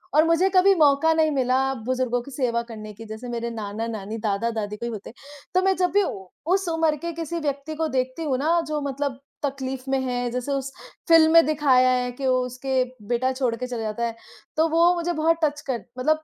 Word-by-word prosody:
और 305 - +7
मुझे 335 +3 +3
कभी 380 +2 +6
मौका 305 0 +4
नहीं 315 -1 +2
मिला 260 -2 +1 0.3
बुज़ुर्गों 250 -1 0
की 280 - -12
सेवा 245 -3 0
करने 215 -2 -8
की 225 +2 -11
जैसे 220 +3 -7
मेरे 235 0 -3
नाना-नानी, 220 -1 -5
दादा-दादी 210 0 -2
कोई 235 +2 -4
होते, 215 -1 -7 0.4
तो 370 - +4
मैं 385 0 +2
जब 360 -1 +1
भी 405 0 +4
उ 190 - -5 0.3
उस 385 -2 +1
उम्र 325 -2 +2
के 340 +3 -4
किसी 335 +1 -4
व्यक्ति 290 0 -3
को 320 +1 0
देखती 260 +2 -2
हूँ 275 -5 0
ना 320 +5 +2
जो 305 -1 -1
मतलब 280 -1 -3 0.3
तकलीफ़ 265 -1 -4
में 270 - +2
है, 245 -1 -1
जैसे 250 +3 -3
उस 275 -1 -2 0.4
फ़िल्म 325 -2 +6
में 330 0 +8
दिखाया 275 -4 +4
है 250 -1 0
कि 265 +2 -4
वो 255 0 +3
उसके 255 +1 -1 0.2
बेटा 245 +3 +1
छोड़ 255 -3 0
के 250 +2 -5
चला 240 -2 -4
जाता 215 +2 -3
है, 230 -1 -3 0.4
तो 320 +1 +4
वो 335 +2 +4
मुझे 345 0 -1
बहुत 325 +1 +2
टच 295 -1 +1
कर 245 -3 -2
मतलब 310 +4 +1
265 Hz, 215 wpm, -24 LUFS, 240-315 Hz, 0.4 s, में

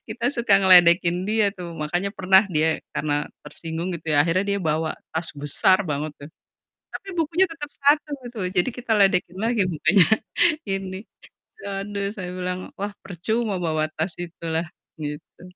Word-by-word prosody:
kita 240 -1 -6
suka 235 -4 0
ngeledekin 180 -1 +6
dia 220 0 +2
tuh 175 -3 -7
makanya 175 +6 -1
pernah 190 +1 +5
dia 160 -1 +1
karena 145 -1 -1 0.3
tersinggung 165 +2 -5
gitu 160 -1 -9
ya, - - +3
akhirnya 170 +4 +1
dia - - -1
bawa 160 +1 0 0.2
tas 160 +1 0
besar 185 +6 +4
banget 150 +1 -2
tuh, 145 +2 -10 0.6
tapi - - -8
bukunya 330 +4 +2
tetep 300 -3 -7
1 295 +2 +3 0.2
gitu, 240 -1 -11 0.2
jadi 180 - +3
kita 245 -2 -4
ledekin 185 -2 +2
lagi 225 -1 +1
bukannya 170 +2 +3 0.6
ini, 195 -1 -3 0.7
waduh 200 0 -3
saya 185 -3 -6
bilang, 180 0 -3 0.2
"Wah 205 +1 -3
percuma 210 +4 -2
bawa 155 -2 0
tas 160 +3 -2
itu 170 -1 -8
lah," 165 +2 0 0.4
gitu, 150 +2 -7
185 Hz, 155 wpm, -23 LUFS, 165-205 Hz, 0.7 s, ngeledekin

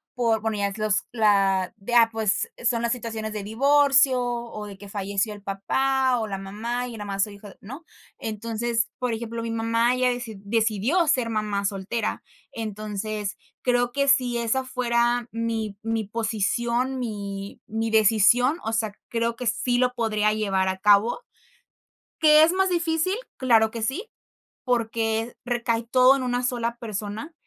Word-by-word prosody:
por 230 -3 +1
bueno, 220 -1 -2
ya 200 0 +1
es 200 - -7
los 215 -1 0
la 195 -4 +2
de 220 +4 -6
ah, 230 -1 +7
pues, 215 -3 0
e 245 - -10
son 235 -1 +2
las 235 - 0
situaciones 225 -2 -5
de 210 -2 -4
divorcio, 270 +2 +4
o, 235 -3 -4
de 200 -1 -10
que 200 0 -12
falleció 200 +1 -2
el 205 - -12
papá, 255 +6 +1
o, 220 - -2
la 195 -1 -4
mamá, 230 +6 -4
y 240 - -8
yo - - -8
nada 205 - -5
más 195 0 0
soy 210 -1 -5
hija 200 0 -12
de - - -16
¿no? 270 +11 -10 0.3
Entonces, 230 +2 -2
por 250 -2 -1
ejemplo, 230 0 -4
mi 230 - -3
mamá, 230 +2 +1
ella 255 0 +2
deci 245 -3 -4
decidió 225 - +1
ser 250 -5 +2
mamá 210 -2 -1
soltera, 200 +3 -2 0.3
entonces 215 -1 -4 0.2
creo 245 -1 +1
que 280 0 +1
si 250 -2 +3
esa 255 +3 0
fuera 240 -1 0
mi 225 -3 -3
mi 225 -1 -1
posición, 235 +4 -1
mi 200 -4 -5
mi 225 +1 -2
decisión, 225 - +4
o 225 - -2
sea, 225 -2 0 0.2
creo 230 0 -1
que 250 - -4
sí 245 +2 +1
lo 250 0 +2
podría 215 -3 +1
llevar 195 -3 0
a 190 0 -3
cabo. 210 - +4 1.0
¿Qué 305 -1 +7
es 330 - +5
más 380 0 +2
difícil? 345 +2 0 0.2
Claro 225 -4 +3
que 230 - -6
sí, 270 - -3 0.6
porque 225 -1 -1
recae 235 -1 0
todo 255 +3 +5
en 260 - -3
una 245 0 -1
sola 235 -1 -1
persona, 215 +6 -5
230 Hz, 175 wpm, -25 LUFS, 210-245 Hz, 1.0 s, ah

